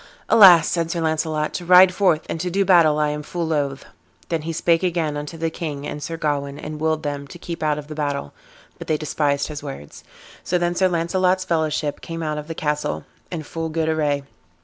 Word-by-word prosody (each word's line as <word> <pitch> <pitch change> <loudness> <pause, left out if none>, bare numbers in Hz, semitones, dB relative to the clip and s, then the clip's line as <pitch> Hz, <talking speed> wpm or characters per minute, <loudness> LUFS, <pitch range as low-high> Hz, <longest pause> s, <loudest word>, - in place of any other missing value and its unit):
"Alas!" 180 -7 +8
said 165 -2 -1
Sir 170 - -2
Launcelot, 155 -1 -1
"to - - -4
ride 180 +1 +7
forth 180 -5 +2
and 165 - -4
to 180 - -2
do 195 +2 +1
battle 170 -5 +5
I 150 -1 +1
am 150 0 -3
full 170 +3 -4
loath." 145 -4 -2 0.4
Then 165 -2 -1
he 165 +2 -4
spake 165 +1 +2
again 170 -5 -1
unto 150 +3 -6
the 165 0 -2
king 150 -4 -5
and 150 - -5
Sir 165 +2 -5
Gawain, 145 -2 -2
and 150 +1 -7
willed 155 0 0
them 145 -1 -4
to 175 - -11
keep 170 -1 -7
out 150 -1 +1
of 150 - -6
the 155 - -7
battle; 145 - -3 0.5
but - - -8
they 155 - +1
despised 145 -2 0
his 150 -2 -6
words. 135 - -9 0.4
So 180 - 0
then 175 0 0
Sir 185 +2 +2
Launcelot's 185 +2 +1
fellowship 155 -3 -1
came 165 0 -6
out 150 -1 -2
of 150 - -8
the 165 - -5
castle 150 -1 -2 0.3
in 165 -3 -4
full 165 +2 -5
good 160 0 -1
array. 145 -3 0
160 Hz, 215 wpm, -22 LUFS, 150-170 Hz, 0.5 s, Alas